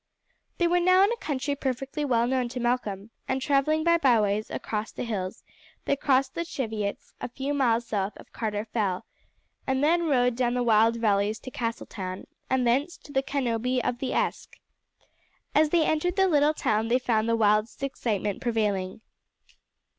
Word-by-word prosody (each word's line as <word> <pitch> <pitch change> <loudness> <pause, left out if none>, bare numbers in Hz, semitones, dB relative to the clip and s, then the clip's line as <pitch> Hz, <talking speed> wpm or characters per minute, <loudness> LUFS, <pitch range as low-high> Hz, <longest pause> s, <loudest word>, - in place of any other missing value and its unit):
They 345 - +2
were 355 +1 +3
now 370 +2 +5
in 405 - +3
a - - 0
country 285 - -2
perfectly 270 +2 -3
well 240 -4 +2
known 250 -1 0
to 250 +1 -5
Malcolm, 230 -4 -2 0.2
and 260 - 0
travelling 290 +3 +2
by 335 0 +4
byways 215 -6 +2
across 215 0 -4
the - - -5
hills 195 -6 -4 0.4
they 280 - +2
crossed 265 -1 +1
the 335 - -2
Cheviots 220 -10 -4
a - - -3
few 270 +4 -3
miles 240 -4 +2
south 200 -1 -2
of - - -15
Carter 215 -2 -2
Fell, 205 -5 -2 0.6
and 265 +1 +1
then 335 +2 +3
rode 250 -4 +2
down 245 0 0
the 250 - +1
wild 225 0 +4
valleys 210 -1 +1
to 255 - -8
Castletown 205 -6 -4 0.2
and 260 -1 +2
thence 275 +8 +1
to 285 - -14
Canobie 250 -2 -1
of 245 0 -2
the 265 - -2
Esk. - - -2 1.0
As 305 0 +4
they 330 -1 +3
entered 345 +3 0
the 385 -1 +4
little 300 -2 +3
town 215 -3 0
they 240 +2 +3
found 230 -3 0
the 230 - +3
wildest 215 +2 +1
excitement 210 -7 -2
prevailing. 210 -5 -1
245 Hz, 170 wpm, -27 LUFS, 220-280 Hz, 1.0 s, now